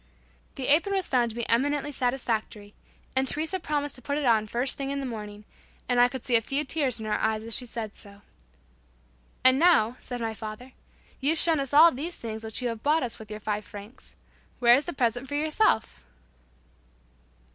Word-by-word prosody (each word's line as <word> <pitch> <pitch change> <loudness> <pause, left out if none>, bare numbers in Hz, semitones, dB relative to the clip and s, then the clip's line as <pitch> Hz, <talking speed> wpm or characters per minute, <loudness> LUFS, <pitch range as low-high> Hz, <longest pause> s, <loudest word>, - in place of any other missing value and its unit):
The 265 - -4
apron 340 +7 +3
was 380 -2 +1
found 245 -3 +2
to 220 - -8
be 235 -1 -3
eminently 290 +4 +1
satisfactory, 230 -5 -2 0.4
and 265 0 +1
Teresa 320 +7 0
promised 290 -3 -2
to 255 - -9
put 285 +4 -2
it 295 - -1
on 225 -3 +3
the - - -15
first 245 +4 -1
thing 275 -1 -4
in 280 0 -2
the 275 - -4
morning, 210 -3 -7 0.4
and 245 -1 +3
I 245 - +7
could 255 -1 -8
see 245 - +2
a 225 - +5
few 275 +6 -2
tears 270 -5 0
in 220 - -6
her 210 -1 -1
eyes 220 0 0
as 230 0 -2
she 250 - -2
said 220 -3 -6
so. 200 0 -12 1.2
"And 260 +1 +5
now," 255 -9 +4
said 245 -1 -6
my 225 -1 -2
father, 220 +4 -8 0.5
"you've 295 +5 +1
shown 320 -1 +4
us 275 -2 -3
all 315 +4 +8
these 320 +6 -5
things 220 -1 -6
which 220 +3 -5
you 245 - 0
have 230 -1 -5
bought 300 +3 +2
us 240 - -4
with 220 -1 -11
your 215 0 -6
five 210 0 -3
francs. 205 +4 -12 0.4
Where 240 -1 +6
is 275 +4 +3
the 350 - -4
present 245 0 -1
for 285 - -4
yourself?" 310 - +1
250 Hz, 210 wpm, -27 LUFS, 220-285 Hz, 1.2 s, all